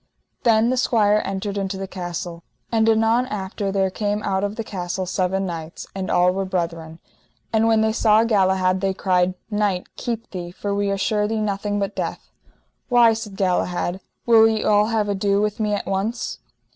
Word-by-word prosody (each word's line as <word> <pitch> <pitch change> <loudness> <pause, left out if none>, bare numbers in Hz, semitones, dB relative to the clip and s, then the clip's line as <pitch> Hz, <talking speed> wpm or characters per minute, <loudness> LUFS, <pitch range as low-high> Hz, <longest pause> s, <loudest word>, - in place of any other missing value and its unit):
Then 230 0 +3
the 255 - 0
squire 215 -4 +3
entered 195 +1 -3
into 195 0 -3
the 195 - -4
castle. 175 -2 -5 0.3
And 225 -1 +3
anon 225 +3 +3
after 195 -1 -3
there 195 -1 +1
came 210 +1 -2
out 190 0 0
of 205 +1 -2
the 225 - -3
castle 185 -2 -4
seven 190 +1 -1
knights, 165 -2 -6
and 190 -1 -4
all 180 0 +4
were 195 +1 -2
brethren. 165 -3 -3 0.6
And 225 0 +3
when 225 -1 +4
they 220 0 +2
saw 220 -1 +4
Galahad 190 -4 +2
they 195 -1 0
cried: 185 -1 +1 0.2
Knight, 205 -3 -1
keep 230 -1 -4
thee, 175 -2 -5
for 200 +3 -4
we 200 0 0
assure 210 +1 0
thee 220 0 -1
nothing 205 0 -1
but 200 0 -2
death. - - -5 0.6
Why, 240 -2 +6
said 220 -3 -6
Galahad, 180 -1 0 0.3
will 225 -2 +7
ye 220 -1 -1
all 210 0 +4
have 220 -2 0
ado 200 0 +1
with 210 +1 -1
me 210 -1 +1
at - - -4
once? 195 +5 -2
200 Hz, 185 wpm, -22 LUFS, 185-220 Hz, 0.6 s, will